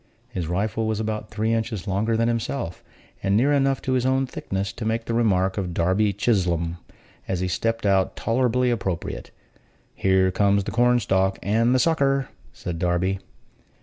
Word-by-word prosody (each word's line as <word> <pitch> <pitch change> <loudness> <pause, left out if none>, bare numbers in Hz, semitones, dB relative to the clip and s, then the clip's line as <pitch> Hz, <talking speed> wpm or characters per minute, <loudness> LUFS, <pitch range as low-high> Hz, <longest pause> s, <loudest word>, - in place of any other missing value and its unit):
His 90 -4 -4
rifle 105 +5 -1
was 110 -1 -1
about 110 -1 -3
three 110 +2 0
inches 110 -3 -2
longer 105 +4 0
than 115 +1 +2
himself, 115 -4 -3 0.4
and 100 +1 +2
near 140 +6 +3
enough 135 -1 +1
his 130 -1 +1
own 130 +1 +2
thickness 100 -5 -4
to 115 - -7
make 115 +1 -1
the 115 - -2
remark 95 -4 +2
of 90 -3 -4
Darby 95 +5 +2
Chislom, 90 -5 0 0.5
as 95 -2 -1
he 95 - -1
stepped 115 +6 -1
out, 95 -1 +2
tolerably 125 +1 +1
appropriate: 95 -7 -3 0.6
"Here 95 -1 +2
comes 100 +1 +2
the - - -4
corn 125 +1 +3
stalk 95 -2 +1
and 115 +6 +2
the - - +3
sucker!" 140 -2 +2 0.2
said 85 -2 -6
Darby. 90 +2 0
105 Hz, 165 wpm, -24 LUFS, 95-120 Hz, 0.6 s, near